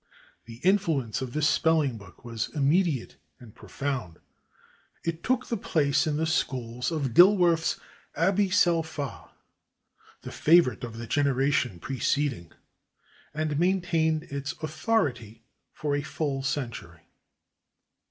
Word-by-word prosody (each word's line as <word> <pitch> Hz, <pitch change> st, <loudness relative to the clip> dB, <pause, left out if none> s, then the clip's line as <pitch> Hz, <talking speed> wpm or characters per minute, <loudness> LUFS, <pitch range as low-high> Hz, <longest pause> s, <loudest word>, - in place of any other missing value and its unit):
The 115 Hz, 0 st, -11 dB
influence 160 Hz, -, +1 dB
of 125 Hz, -2 st, -5 dB
this 150 Hz, 0 st, +2 dB
spelling 155 Hz, -8 st, +2 dB
book 100 Hz, +3 st, -16 dB
was 115 Hz, 0 st, -3 dB
immediate 150 Hz, -2 st, +1 dB, 0.2 s
and 115 Hz, -4 st, -14 dB
profound. 130 Hz, -12 st, -5 dB, 0.9 s
It 165 Hz, 0 st, -3 dB
took 255 Hz, 0 st, 0 dB
the 235 Hz, -, -2 dB
place 150 Hz, -, +1 dB
in 150 Hz, -1 st, 0 dB
the 160 Hz, -, 0 dB
schools 125 Hz, -6 st, -2 dB
of 140 Hz, -7 st, -2 dB
Dilworth's 175 Hz, -, +5 dB, 0.4 s
"Aby 195 Hz, +4 st, +2 dB
sel 175 Hz, -2 st, +3 dB
pha," 150 Hz, -4 st, -7 dB, 0.9 s
the -, -, -7 dB
favorite 155 Hz, -9 st, +3 dB
of 115 Hz, -2 st, -6 dB
the 115 Hz, -, -6 dB
generation 135 Hz, -4 st, +1 dB
preceding, 130 Hz, -, -1 dB, 0.8 s
and 155 Hz, 0 st, -2 dB
maintained 170 Hz, -3 st, +1 dB
its 140 Hz, -1 st, -5 dB
authority 140 Hz, -, -1 dB, 0.3 s
for 145 Hz, -1 st, -2 dB
fully 145 Hz, -2 st, -3 dB
a -, -, -6 dB
century. 120 Hz, -, -4 dB
145 Hz, 120 wpm, -27 LUFS, 125-165 Hz, 0.9 s, Dilworth's